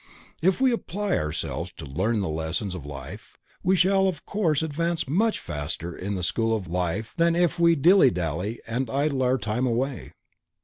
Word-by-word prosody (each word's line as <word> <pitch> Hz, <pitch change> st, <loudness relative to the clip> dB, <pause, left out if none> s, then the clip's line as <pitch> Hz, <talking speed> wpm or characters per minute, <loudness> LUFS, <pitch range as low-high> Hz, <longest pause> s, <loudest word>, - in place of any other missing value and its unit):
If 185 Hz, +5 st, +3 dB
we 260 Hz, -1 st, +4 dB
apply 205 Hz, -3 st, -1 dB
ourselves 75 Hz, -1 st, -3 dB
to -, -, -7 dB
learn 105 Hz, +11 st, 0 dB
the 95 Hz, -, -1 dB
lessons 80 Hz, +5 st, -2 dB
of 80 Hz, -6 st, -7 dB
life, 70 Hz, -2 st, -9 dB, 0.2 s
we 185 Hz, +2 st, +3 dB
shall 190 Hz, +1 st, +4 dB
of 180 Hz, -6 st, -3 dB
course 165 Hz, -8 st, +1 dB
advance 165 Hz, +1 st, -1 dB
much 210 Hz, +10 st, +1 dB
faster 80 Hz, +3 st, -4 dB
in 100 Hz, +2 st, -4 dB
the 90 Hz, -, -3 dB
school 115 Hz, +5 st, +1 dB
of 100 Hz, -4 st, -4 dB
life 90 Hz, +5 st, -2 dB
than 170 Hz, 0 st, +3 dB
if 175 Hz, -2 st, +1 dB
we 170 Hz, 0 st, +5 dB
dilly 170 Hz, 0 st, +6 dB
dally 90 Hz, +4 st, -3 dB
and 120 Hz, +2 st, -2 dB
idle 140 Hz, +1 st, 0 dB
our 130 Hz, +1 st, +3 dB
time 115 Hz, +2 st, -1 dB
away. 125 Hz, +2 st, -2 dB
125 Hz, 180 wpm, -25 LUFS, -, 0.2 s, dilly